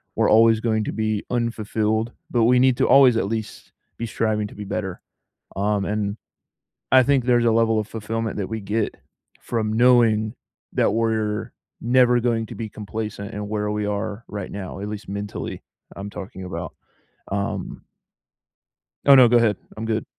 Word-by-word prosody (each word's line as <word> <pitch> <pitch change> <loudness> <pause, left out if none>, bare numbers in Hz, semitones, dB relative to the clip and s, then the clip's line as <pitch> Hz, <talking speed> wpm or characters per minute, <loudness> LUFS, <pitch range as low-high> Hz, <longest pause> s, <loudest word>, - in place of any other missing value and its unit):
We're - - +2
always 115 0 +5
going 110 -2 0
to - - -3
be 110 -1 -1
unfulfilled, 110 -1 -1 0.2
but 120 -2 +2
we 125 +1 +5
need 130 -1 +4
to - - +2
always 130 -4 +6
at - - +1
least 110 0 -5 0.2
be 115 - -3
striving 110 -1 -1
to - - -14
be 105 - -6
better, 95 -2 -4 0.5
um, 100 +1 0
and 105 0 -2 0.7
I 130 0 +7
think 135 -1 +2
there's 120 -1 +3
a 115 - +4
level 115 -1 +3
of 105 - -3
fulfillment 110 0 -4
that 100 - -2
we 110 -1 -4
get 105 +2 -2 0.5
from 110 -2 -2
knowing 115 -2 +4 0.4
that - - +2
we're 110 -1 -1 0.3
never 125 0 +4
going 115 -2 0
to - - -9
be 110 -2 -5
complacent 105 -1 -6
in 105 0 -5
where 105 -1 -1
we 105 0 -2
are 105 +1 -3
right 100 -2 -6
now, 95 -1 -6
at 100 - -5
least 105 -2 -7
mentally, 100 +1 -5 0.3
I'm 100 +1 -6
talking 95 -1 -8
about. 85 -3 -6 0.6
Um... 100 0 -3 1.2
Oh, 140 - +8
no, 130 -2 +8
go 120 +1 +5
ahead. 110 -3 +2 0.2
I'm 110 - -4
good. 110 0 -1
110 Hz, 170 wpm, -23 LUFS, 105-115 Hz, 1.2 s, Oh